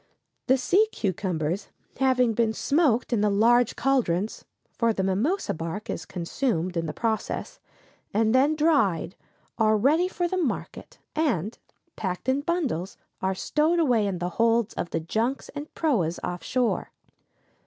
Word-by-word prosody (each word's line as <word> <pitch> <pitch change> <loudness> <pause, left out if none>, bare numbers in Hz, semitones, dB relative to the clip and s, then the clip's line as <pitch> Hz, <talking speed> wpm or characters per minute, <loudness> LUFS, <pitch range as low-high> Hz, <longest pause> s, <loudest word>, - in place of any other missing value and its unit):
] - - -52
The 260 +1 +5
sea 380 - +3
cucumbers 180 -3 -2 0.3
having 255 -3 +3
been 225 0 +1
smoked 260 -4 +1
in 220 - +2
the 210 - +3
large 230 +4 +3
caldrons 220 -8 0 0.3
(for 230 -1 +1
the 190 - -1
mimosa 205 - 0
bark 165 +5 -5
is - - -6
consumed 180 0 -2
in 165 -1 -1
the - - -2
process), 220 +1 -3 0.5
and 220 +2 +2
then 280 +4 +4
dried, 280 - +2 0.4
are 215 -1 +4
ready 305 - +3
for 355 -1 -1
the 370 - -2
market, 340 - -4 0.2
and, 230 - 0 0.4
packed 185 +3 -4
in 265 +2 +2
bundles, 285 - -2 0.2
are 190 0 0
stowed 310 - +1
away 245 -10 +3
in 190 -2 -2
the 175 +1 -2
holds 230 -1 +3
of 175 - -4
the 165 - -1
junks 225 +11 -2
and 290 +1 -7
proas 195 - +1
off 180 0 -3
shore. 250 -3 0
230 Hz, 155 wpm, -26 LUFS, 190-275 Hz, 0.5 s, The